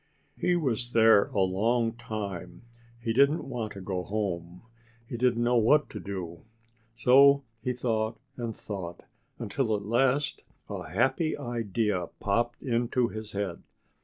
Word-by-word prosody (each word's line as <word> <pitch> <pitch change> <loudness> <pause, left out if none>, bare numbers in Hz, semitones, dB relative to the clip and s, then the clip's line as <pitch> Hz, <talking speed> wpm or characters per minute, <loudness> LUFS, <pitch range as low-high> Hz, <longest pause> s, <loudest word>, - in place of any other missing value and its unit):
He 180 0 +1 0.4
there 110 -3 +6
a 100 - -1
long 115 +5 +1
time. 110 -7 -6 0.4
He 115 -1 -1
didn't 140 +6 +3
want 120 -5 -4
to 100 - -8
go 95 -1 -2
home. 90 -4 -4 0.4
He 115 - -6
didn't 120 -1 +2
know 120 +1 +3
what 145 +7 +4
to - - -6
do. 90 -4 -6 0.5
So 140 +4 +6 0.2
he 125 - -1
thought 115 -2 -1 0.2
and 115 -3 -4
thought; 95 -5 -7 0.3
until 115 -5 -1
at 100 -1 -5
last 130 +6 +1 0.2
a 80 - -6
happy 130 - +1
idea 105 -6 -1
popped 120 +4 0
into 120 -1 +1
his 110 -1 -7
head. 100 -4 -3
115 Hz, 135 wpm, -28 LUFS, 100-125 Hz, 0.5 s, there